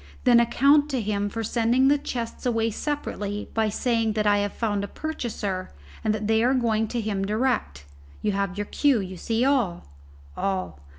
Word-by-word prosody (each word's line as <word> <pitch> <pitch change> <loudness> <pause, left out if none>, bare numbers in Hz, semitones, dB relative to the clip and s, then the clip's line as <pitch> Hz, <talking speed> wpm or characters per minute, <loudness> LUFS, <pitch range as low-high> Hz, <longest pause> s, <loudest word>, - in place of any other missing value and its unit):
"Then 245 -2 +6
account 280 +5 +4
to 265 -3 -1
him 205 -2 -1
for 225 +2 -4
sending 240 +4 +2
the 290 +1 +4
chests 240 -3 -4
away 225 -1 +1
separately 210 -6 -4
by 220 -1 +1
saying 230 0 0
that 210 0 0
I 205 0 +4
have 205 0 -1
found 205 -3 -1
a - - -3
purchaser, 210 -10 -4 0.3
and 215 - +2
that 215 0 -2
they 220 +1 +3
are 255 +2 +3
going 225 -3 +1
to 240 - -3
him 210 -3 -2
direct. 215 - -1 0.4
You 210 - +2
have 200 -1 -2
your 205 - -2
cue 280 +2 +2
you 190 -1 -5
see 225 +6 0
all!" 245 -11 +1 0.5
"All." 185 - -2
225 Hz, 185 wpm, -25 LUFS, 205-245 Hz, 0.5 s, Then